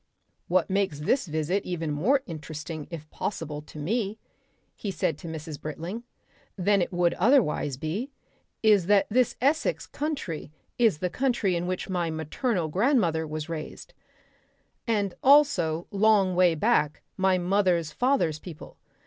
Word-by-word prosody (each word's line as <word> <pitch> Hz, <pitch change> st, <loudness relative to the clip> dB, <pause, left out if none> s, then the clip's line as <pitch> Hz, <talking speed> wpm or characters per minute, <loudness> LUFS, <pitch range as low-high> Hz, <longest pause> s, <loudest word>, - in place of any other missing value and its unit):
"What 180 Hz, 0 st, +2 dB
makes 190 Hz, -6 st, 0 dB
this 225 Hz, -, +1 dB
visit 160 Hz, +5 st, -1 dB
even 165 Hz, -4 st, -3 dB
more 240 Hz, -, +2 dB
interesting 155 Hz, -1 st, -7 dB
if 160 Hz, -3 st, -8 dB
possible 150 Hz, -6 st, -4 dB
to 150 Hz, -, -13 dB
me," 205 Hz, +7 st, -1 dB, 0.6 s
he 205 Hz, -, -5 dB
said 165 Hz, -4 st, -1 dB
to -, -, -8 dB
Mrs. 160 Hz, -2 st, -7 dB
Britling, 165 Hz, +8 st, -5 dB, 0.6 s
"than 200 Hz, +1 st, +3 dB
it -, -, -1 dB
would 175 Hz, -1 st, +2 dB
otherwise 210 Hz, -, +3 dB
be, 175 Hz, -, -3 dB, 0.5 s
is 205 Hz, -5 st, +5 dB
that 205 Hz, -1 st, +5 dB
this 250 Hz, +1 st, +2 dB
Essex 310 Hz, -, +1 dB
country 280 Hz, -, -4 dB, 0.3 s
is 225 Hz, -9 st, +4 dB
the 180 Hz, +2 st, -2 dB
country 240 Hz, -8 st, +1 dB
in 170 Hz, +1 st, -2 dB
which 185 Hz, 0 st, -3 dB
my 175 Hz, -3 st, -1 dB
maternal 160 Hz, -, -1 dB
grandmother 180 Hz, -, +2 dB
was 155 Hz, 0 st, -5 dB
raised, 160 Hz, -2 st, -7 dB, 0.9 s
and 205 Hz, -5 st, 0 dB
also 225 Hz, -, +4 dB
long 200 Hz, -2 st, +3 dB
way 180 Hz, -2 st, +4 dB
back 150 Hz, -1 st, +1 dB
my 190 Hz, -1 st, +2 dB
mother's 180 Hz, -3 st, +1 dB
father's 245 Hz, -, +1 dB
people. 165 Hz, -3 st, -11 dB
180 Hz, 140 wpm, -27 LUFS, 160-215 Hz, 0.9 s, is